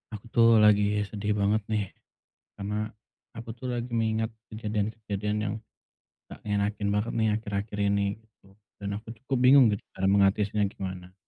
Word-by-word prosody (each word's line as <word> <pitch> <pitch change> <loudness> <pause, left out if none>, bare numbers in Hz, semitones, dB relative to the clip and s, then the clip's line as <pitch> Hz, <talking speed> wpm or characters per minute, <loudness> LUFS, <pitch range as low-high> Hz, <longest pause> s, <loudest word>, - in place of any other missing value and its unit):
Aku, 100 - -11
tuh, 115 -1 +5 0.2
lagi 105 0 +4
sedih 105 0 -2
banget, 105 +2 +2
nih. 105 -2 +1 0.7
Karena 100 +1 -4 0.6
aku, 115 0 -9
tuh, 130 - -6
lagi 120 +1 -4
mengingat 110 -1 0 0.2
kejadian-kejadian 105 -1 -2
yang 105 - -2 0.8
gak - - -10
ngenakin 105 0 -1
banget, 105 +3 -1
nih, 110 -1 +2
akhir-akhir 105 -1 -4
ini, 100 0 +2 0.2
gitu. 110 -3 -28 0.3
Dan 100 -1 -5
aku 110 - -13
cukup 135 0 -1
bingung 130 +1 +8
gitu 100 - -4 0.2
cara 95 - 0
mengatasinya 100 +1 +3
gimana. 95 -2 -7
105 Hz, 150 wpm, -27 LUFS, 100-110 Hz, 0.8 s, bingung